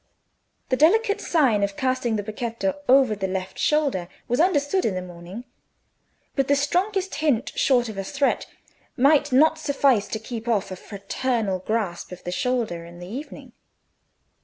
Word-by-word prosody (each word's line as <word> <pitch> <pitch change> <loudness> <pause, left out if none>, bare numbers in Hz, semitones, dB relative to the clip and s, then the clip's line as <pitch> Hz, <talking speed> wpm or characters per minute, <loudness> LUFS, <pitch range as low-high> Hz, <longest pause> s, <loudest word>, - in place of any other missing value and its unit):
The 255 - +3
delicate 410 - +3
sign 260 - +2
of 200 0 -1
casting 255 -3 0
the 205 - -2
becchetto 230 +6 -2 0.2
over 260 -3 +6
the 190 -1 -2
left 185 0 -4
shoulder 280 - +1 0.2
was 245 - 0
understood 340 +1 +2
in 205 - 0
the 185 - -2
morning, 180 +5 -9 0.9
but 275 -2 +1
the 285 - +4
strongest 370 +7 0
hint 285 -4 0
short 245 -3 +3
of 215 -3 -6
a - - -2
threat 275 +7 0 0.5
might 285 +2 +4
not 315 +5 +4
suffice 275 -7 +2
to - - -3
keep 225 +1 -7
off 210 -5 0
a - - -4
fraternal 200 +1 -2
grasp 195 -4 -3
of 180 - -9
the 175 - -4
shoulder 220 -5 -1
in 170 +1 -12
the 175 - -9
evening. 255 +11 -8
245 Hz, 160 wpm, -24 LUFS, 200-285 Hz, 0.9 s, over